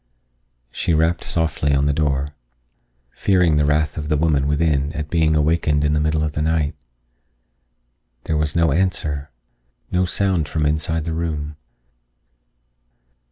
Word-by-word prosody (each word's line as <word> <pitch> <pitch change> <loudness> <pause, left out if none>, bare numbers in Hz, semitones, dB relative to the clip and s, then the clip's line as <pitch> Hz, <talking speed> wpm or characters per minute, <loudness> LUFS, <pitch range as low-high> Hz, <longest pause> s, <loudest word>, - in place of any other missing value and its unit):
She 85 - 0
rapped 80 +2 +1
softly 75 -3 0
on 70 +1 +2
the 70 - +2
door, 70 -2 0 0.8
fearing 90 -5 +2
the 75 - +3
wrath 75 +1 +1
of 75 0 -5
the 75 - +2
woman 75 -3 +1
within 75 -1 +1
at 75 -2 -5
being 80 -2 +2
awakened 75 -1 +2
in 75 - +2
the 75 - +2
middle 75 0 +1
of 75 - -1
the 75 - -3
night. 80 -1 0 1.5
There 80 - -2
was 75 -1 -1
no 85 -3 +3
answer, 75 -4 -1 0.6
no 90 +1 +2
sound 90 -4 0
from 80 -2 -1
inside 80 +1 0
the 80 - -2
room. 75 -2 -3
75 Hz, 145 wpm, -21 LUFS, 75-80 Hz, 1.5 s, the